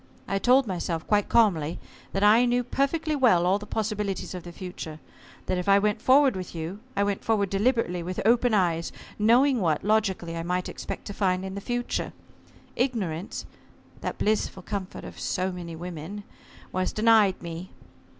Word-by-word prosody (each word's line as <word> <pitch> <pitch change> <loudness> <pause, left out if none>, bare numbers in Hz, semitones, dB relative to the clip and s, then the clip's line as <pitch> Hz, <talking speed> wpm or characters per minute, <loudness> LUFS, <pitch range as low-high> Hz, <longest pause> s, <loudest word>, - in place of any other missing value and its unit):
I 195 - 0
told 255 +5 +4
myself, 170 -4 -3
quite 205 -1 +1
calmly, 175 -9 +3 0.3
that 195 - -1
I 220 +4 +6
knew 245 0 +2
perfectly 300 +5 0
well 225 -11 +4
all 190 +3 +3
the 210 - -10
possibilities 210 -4 -2
of 180 - -5
the 175 - -9
future. 170 -3 -7 0.5
That 185 - -1
if 180 - -2
I 200 - +7
went 210 +1 +1
forward 270 -1 +5
with 185 -2 -6
you, 165 +5 -5 0.2
I 200 - +2
went 200 -1 -1
forward 205 -4 +1
deliberately 200 -4 +1
with 180 +2 -4
open 240 0 +4
eyes, 170 -4 +1 0.3
knowing 245 +5 +4
what, 160 -4 +1
logically, 195 -5 +1
I 165 - -3
might 180 +2 -1
expect - - -6
to 205 - -6
find 185 -2 0
in 190 - -5
the 200 - -5
future. 245 +3 -2 0.6
Ignorance 205 -9 -2 0.5
that - - -4
blissful 210 -3 0
comfort 200 -2 -5
of - - -9
so 185 +1 -1
many 175 -2 -7
women, 175 +4 -7 0.5
was 185 0 -1
denied 215 -3 +4
me. 170 +2 -6
195 Hz, 170 wpm, -26 LUFS, 180-225 Hz, 0.6 s, I